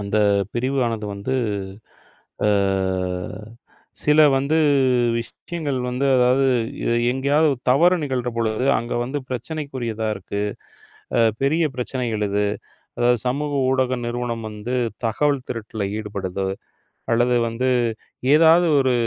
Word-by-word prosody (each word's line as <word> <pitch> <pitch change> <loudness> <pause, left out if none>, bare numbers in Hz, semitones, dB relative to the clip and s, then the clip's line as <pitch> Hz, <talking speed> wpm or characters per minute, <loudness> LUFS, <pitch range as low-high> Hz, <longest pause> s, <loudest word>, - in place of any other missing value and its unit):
அந்தப் 100 -1 +1
பிரிவு 130 +3 -1
ஆனது 110 -2 -3
வந்து, 105 +7 -3 1.1
ஆ - - +3 1.6
சில 150 +1 +4 0.2
வந்து 140 +4 +1 0.6
விஷயங்கள் 145 +4 -5
வந்து 125 +3 -1
அதாவது 125 +2 +3 0.4
எ - - +1 0.2
எங்கயாவது 140 +3 +2
தவறு 170 +8 +5
நிகழ்றபொழுது 120 -3 -1
அங்க 120 +1 -5
வந்து 130 +4 -3
பிரச்சினைக்குரியதா 125 -4 -4
இருக்கு. 100 0 -5 0.8
அ, - - +4 0.2
பெரிய 155 +5 +2
பிரச்சனைகள் 120 -4 -2
இது. 100 +1 0 0.5
அதாவது 120 0 +3
சமூக 145 +3 -1 0.2
ஊடக 130 -1 +1
நிறுவனம் 120 -1 -3
வந்து 105 +4 -4 0.3
தகவல் 140 +4 +1
திருட்டுல 110 -2 -4
ஈடுபடுது 100 -3 -4 0.7
அல்லது 120 +1 +3
வந்து 125 +3 -1 0.6
ஏதாவது 165 +2 +6
ஒரு 130 -2 +2
125 Hz, 105 wpm, -22 LUFS, 110-140 Hz, 1.6 s, ஏதாவது